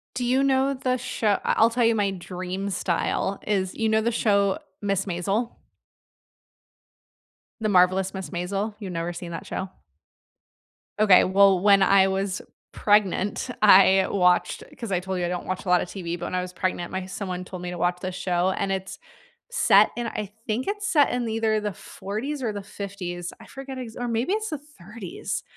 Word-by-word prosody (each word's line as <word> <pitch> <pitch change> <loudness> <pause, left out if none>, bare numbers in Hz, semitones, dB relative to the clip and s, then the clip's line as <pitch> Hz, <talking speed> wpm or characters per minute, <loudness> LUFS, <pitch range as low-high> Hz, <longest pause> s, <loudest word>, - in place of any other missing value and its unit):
Do 250 -1 -1
you 260 +2 +3
know 270 0 +2
the 255 -1 -1
sho 210 -4 0
I - - +1
I'll 225 +1 +5
tell 240 +1 +1
you 230 0 +4
my 205 -2 +1
dream 185 +1 -5
style 190 +1 -1
is, 190 -3 0
you 225 -1 0
know 220 0 +2
the 235 +1 0
show 200 -3 +2 0.2
"Miss 195 -1 0
Maisel"? 195 +6 -1 2.1
"The 215 - 0
Marvelous 185 0 +3
Mrs. 190 -1 -6
Maisel"? 195 +4 -3
You've 195 -4 -6
never 170 +1 -3
seen 175 0 -7
that - - -6
show? 190 - -4 1.3
Okay, 200 -4 +7
well, 190 -1 +5
when 200 0 +5
I 195 0 +5
was 190 0 -2 0.3
pregnant, 205 +2 +1
I 190 -1 +7
watched 180 -2 +2 0.2
'cause 230 -6 -5
I 180 - +1
told 190 0 -4
you, 175 - -1
I - - -2
don't 180 0 -4
watch 185 0 -3
a - - -7
lot 180 -1 +5
of - - -4
TV, 175 -3 -4
but - - -5
when - - -5
I 180 - +1
was 180 0 -7
pregnant, 180 -1 -2
my 190 0 -3
someone 185 -1 -5
told 180 -1 -8
me 180 - -4
to 180 - -6
watch 175 +1 0
this 185 0 -4
show, 180 0 0
and 195 +1 -2
it's 190 0 -4 0.5
set - - +5
in 240 0 -2
I 210 -3 -5
think 225 +3 -1
it's 410 0 -2
set 290 -3 +4
in 245 -1 -1
either 220 -1 +1
the 210 -1 -3
40s 250 - -5
or 225 -3 -1
the 205 -1 -6
50s. 185 -3 -6
I - - -13
forget 270 -1 -8
ex 235 -3 -7
or 245 - -3
maybe 235 +9 0
it's 435 0 -3
the 305 - -3
30s. 215 - -7
195 Hz, 195 wpm, -25 LUFS, 185-225 Hz, 2.1 s, Okay